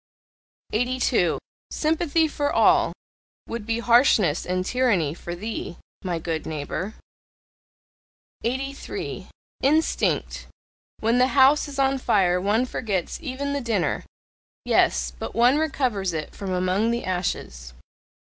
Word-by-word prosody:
82. 245 Hz, +3 st, +1 dB, 0.3 s
"Sympathy 320 Hz, 0 st, +1 dB
for 290 Hz, -1 st, -1 dB
all" -, -, +4 dB, 0.5 s
would 230 Hz, -2 st, -6 dB
be 230 Hz, 0 st, 0 dB
harshness 235 Hz, -, +3 dB
and 185 Hz, 0 st, -1 dB
tyranny 205 Hz, -, +1 dB
for 175 Hz, +1 st, -7 dB
THEE, 210 Hz, -2 st, -5 dB, 0.3 s
my 180 Hz, -3 st, -1 dB
good 165 Hz, -1 st, -3 dB
neighbour. 160 Hz, +7 st, -4 dB, 1.5 s
83. 270 Hz, +4 st, -4 dB, 0.3 s
INSTINCT 310 Hz, +4 st, +1 dB, 0.5 s
When 230 Hz, +3 st, +2 dB
the 255 Hz, -, +5 dB
house 275 Hz, +3 st, +6 dB
is 280 Hz, -1 st, -8 dB
on 270 Hz, 0 st, +2 dB
fire 180 Hz, -6 st, +2 dB
one 210 Hz, +6 st, +2 dB
forgets 205 Hz, -8 st, -3 dB
even 280 Hz, -1 st, -3 dB
the 285 Hz, -, -1 dB
dinner 225 Hz, -7 st, -1 dB, 0.6 s
Yes, 60 Hz, 0 st, +2 dB
but -, -, -6 dB
one 245 Hz, +5 st, +4 dB
recovers 250 Hz, -, 0 dB
it 155 Hz, -2 st, -4 dB
from 195 Hz, -2 st, -5 dB
among 185 Hz, +4 st, +1 dB
the 235 Hz, +1 st, -1 dB
ashes. 65 Hz, -, -3 dB
230 Hz, 120 wpm, -24 LUFS, 180-265 Hz, 1.5 s, house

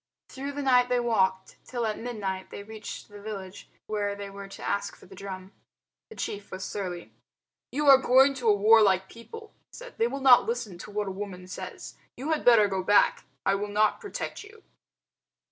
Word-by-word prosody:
Through 275 Hz, +2 st, -6 dB
the 285 Hz, 0 st, -4 dB
night 250 Hz, -2 st, +4 dB
they 250 Hz, 0 st, +2 dB
walked 190 Hz, -5 st, 0 dB
till 240 Hz, -2 st, -3 dB
at 215 Hz, -1 st, -2 dB
midnight 200 Hz, -6 st, -4 dB
they 200 Hz, -, -8 dB
reached 220 Hz, +1 st, -8 dB
the 205 Hz, -1 st, -13 dB
village 200 Hz, -3 st, -8 dB, 0.2 s
where 205 Hz, -1 st, -2 dB
they 200 Hz, -1 st, -7 dB
were 200 Hz, 0 st, -9 dB
to 195 Hz, -, -8 dB
ask 200 Hz, -, -2 dB
for -, -, -18 dB
the 190 Hz, -, -15 dB
drum. 190 Hz, -1 st, -8 dB, 0.6 s
The 445 Hz, -, -12 dB
chief 205 Hz, -, -5 dB
was 190 Hz, 0 st, -6 dB
surly. 180 Hz, -4 st, -5 dB, 0.6 s
"You 295 Hz, +2 st, -1 dB
are 270 Hz, -1 st, +9 dB
going 265 Hz, +2 st, +5 dB
to 230 Hz, -, +2 dB
a 210 Hz, -, +5 dB
warlike 200 Hz, -3 st, +4 dB
people," 440 Hz, -, -12 dB, 0.2 s
he -, -, -13 dB
said. -, -, -12 dB
"They 230 Hz, -, +3 dB
will 275 Hz, +3 st, -4 dB
not 260 Hz, -2 st, +6 dB
listen 225 Hz, -6 st, -4 dB
to 205 Hz, -, -9 dB
what 210 Hz, 0 st, -3 dB
a -, -, -3 dB
woman 190 Hz, -2 st, -7 dB
says. 185 Hz, -, -8 dB, 0.2 s
You 285 Hz, +5 st, -3 dB
had 315 Hz, -, 0 dB
better 230 Hz, -4 st, +6 dB
go 190 Hz, -1 st, -2 dB
back. 205 Hz, +2 st, +3 dB, 0.2 s
I -, -, +3 dB
will 200 Hz, +1 st, -2 dB
not 210 Hz, -, +1 dB
protect 410 Hz, -1 st, -6 dB
you." 425 Hz, +1 st, -16 dB
210 Hz, 200 wpm, -27 LUFS, 195-250 Hz, 0.6 s, are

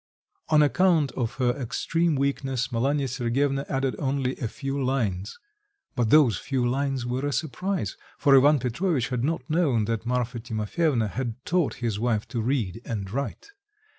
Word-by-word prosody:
On 155 Hz, -1 st, +6 dB
account 155 Hz, 0 st, +3 dB
of 120 Hz, +1 st, -3 dB
her 125 Hz, -2 st, +2 dB
extreme 160 Hz, +6 st, 0 dB
weakness 135 Hz, -2 st, -1 dB
Malanya 135 Hz, +4 st, +1 dB
Sergyevna 135 Hz, +3 st, 0 dB
added 135 Hz, -3 st, 0 dB
only 135 Hz, -2 st, -1 dB
a 120 Hz, -, -2 dB
few 135 Hz, +3 st, -3 dB
lines; 110 Hz, -7 st, -1 dB, 0.6 s
but 120 Hz, -3 st, +1 dB
those 145 Hz, -6 st, +5 dB
few 130 Hz, -3 st, -1 dB
lines 135 Hz, 0 st, -1 dB
were 125 Hz, +2 st, -2 dB
a 145 Hz, -, 0 dB
surprise, 160 Hz, -, -2 dB, 0.2 s
for 140 Hz, -1 st, +5 dB
Ivan 145 Hz, +3 st, +6 dB
Petrovitch 130 Hz, +2 st, -1 dB
had 125 Hz, -2 st, -1 dB
not 145 Hz, -3 st, -1 dB
known 145 Hz, -9 st, +2 dB
that 115 Hz, +1 st, -2 dB
Marfa 125 Hz, 0 st, -1 dB
Timofyevna 115 Hz, +3 st, 0 dB
had 120 Hz, 0 st, -3 dB
taught 175 Hz, -4 st, +1 dB
his 105 Hz, -3 st, -1 dB
wife 115 Hz, -2 st, 0 dB
to 120 Hz, -, -2 dB
read 115 Hz, -4 st, -1 dB
and 100 Hz, -5 st, -4 dB
write. 140 Hz, -, -4 dB
130 Hz, 160 wpm, -26 LUFS, 115-145 Hz, 0.6 s, On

